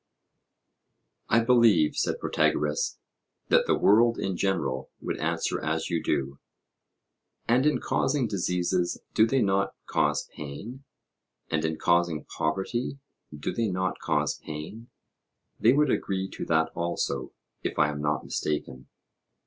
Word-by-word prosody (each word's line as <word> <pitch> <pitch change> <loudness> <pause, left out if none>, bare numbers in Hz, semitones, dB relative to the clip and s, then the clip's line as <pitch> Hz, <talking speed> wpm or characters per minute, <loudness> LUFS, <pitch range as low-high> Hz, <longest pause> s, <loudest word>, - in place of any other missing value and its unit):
I 115 - +5
believe, 115 -10 +4
said - - 0
Protagoras, 75 0 0 0.5
that - - +4
the - - +3
world 115 +3 +5
in 95 -1 -2
general 70 -9 -1
would - - -4
answer - - -1
as 80 +1 -1
you 85 -1 0
do. 70 -1 -1 1.1
And 125 +5 +4
in 150 - +2
causing 135 -2 0
diseases 90 -2 0
do 110 - +5
they 135 +2 +2
not 100 0 +1
cause - - 0
pain? 105 - -8 0.7
and 80 -1 +1
in 80 0 -1
causing 85 -3 +1
poverty 95 - -2 0.3
do 75 -1 -4
they 115 -1 0
not 95 -1 -1
cause - - 0
pain; 80 +10 -8 0.7
they 115 - +5
would 145 0 +3
agree 95 -1 -1
to - - -6
that 80 0 +2
also, 85 0 -2 0.3
if - - -3
I 75 - +4
am 75 0 -5
not 75 0 0
mistaken? 70 -4 -3
90 Hz, 135 wpm, -27 LUFS, 75-115 Hz, 1.1 s, I